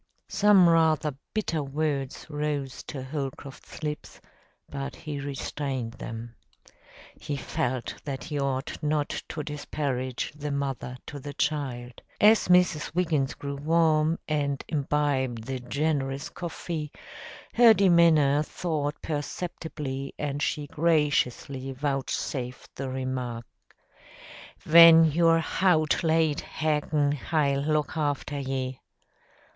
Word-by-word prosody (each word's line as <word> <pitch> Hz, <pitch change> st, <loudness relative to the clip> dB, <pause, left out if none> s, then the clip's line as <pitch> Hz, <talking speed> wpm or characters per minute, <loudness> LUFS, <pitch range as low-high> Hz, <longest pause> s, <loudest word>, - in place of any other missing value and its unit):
Some 205 Hz, -3 st, +5 dB
rather 160 Hz, -3 st, +3 dB, 0.2 s
bitter 185 Hz, -7 st, -1 dB
words 140 Hz, -1 st, -2 dB
rose 145 Hz, -3 st, -3 dB
to 135 Hz, -3 st, -6 dB
Holcroft's 135 Hz, +1 st, -7 dB
lips, 150 Hz, -1 st, -5 dB, 0.5 s
but 140 Hz, 0 st, -5 dB
he 150 Hz, -2 st, -6 dB
restrained 135 Hz, -3 st, -4 dB
them. 115 Hz, -1 st, -7 dB, 0.8 s
He 145 Hz, -, -5 dB
felt 125 Hz, -2 st, -2 dB
that 135 Hz, -2 st, -5 dB
he 150 Hz, -3 st, -3 dB
ought 135 Hz, +1 st, -2 dB
not 150 Hz, -1 st, 0 dB, 0.2 s
to 155 Hz, -, -4 dB
disparage 140 Hz, -4 st, -3 dB
the 150 Hz, 0 st, -5 dB
mother 135 Hz, -3 st, -3 dB
to 145 Hz, -, -7 dB
the 145 Hz, +1 st, -8 dB
child. 125 Hz, -5 st, -2 dB, 0.2 s
As 215 Hz, +1 st, +5 dB
Mrs. 180 Hz, -4 st, +3 dB
Wiggins 155 Hz, -7 st, +1 dB
grew 140 Hz, 0 st, -5 dB
warm, 160 Hz, +1 st, +2 dB
and 145 Hz, -3 st, -1 dB
imbibed 140 Hz, -5 st, 0 dB
the 130 Hz, +2 st, -4 dB
generous 140 Hz, +1 st, -1 dB
coffee, 165 Hz, -3 st, -5 dB, 0.6 s
her 235 Hz, -1 st, +8 dB
demeanor 170 Hz, -8 st, +5 dB
thawed 150 Hz, -2 st, -3 dB
perceptibly 145 Hz, -3 st, -4 dB
and 145 Hz, -1 st, -3 dB
she 150 Hz, -1 st, -1 dB
graciously 145 Hz, -4 st, 0 dB
vouchsafed 135 Hz, -2 st, -3 dB
the 135 Hz, -1 st, -4 dB
remark, 130 Hz, -3 st, -3 dB, 1.2 s
"Ven 165 Hz, 0 st, +9 dB
you're 165 Hz, +1 st, +4 dB
hout 165 Hz, -2 st, +2 dB
late 160 Hz, -2 st, +2 dB
hag'in 150 Hz, -1 st, 0 dB
hi'll 145 Hz, -1 st, 0 dB
look 150 Hz, 0 st, 0 dB
hafter 145 Hz, -1 st, -2 dB
ye." 130 Hz, -1 st, -3 dB
145 Hz, 110 wpm, -27 LUFS, 135-155 Hz, 1.2 s, Ven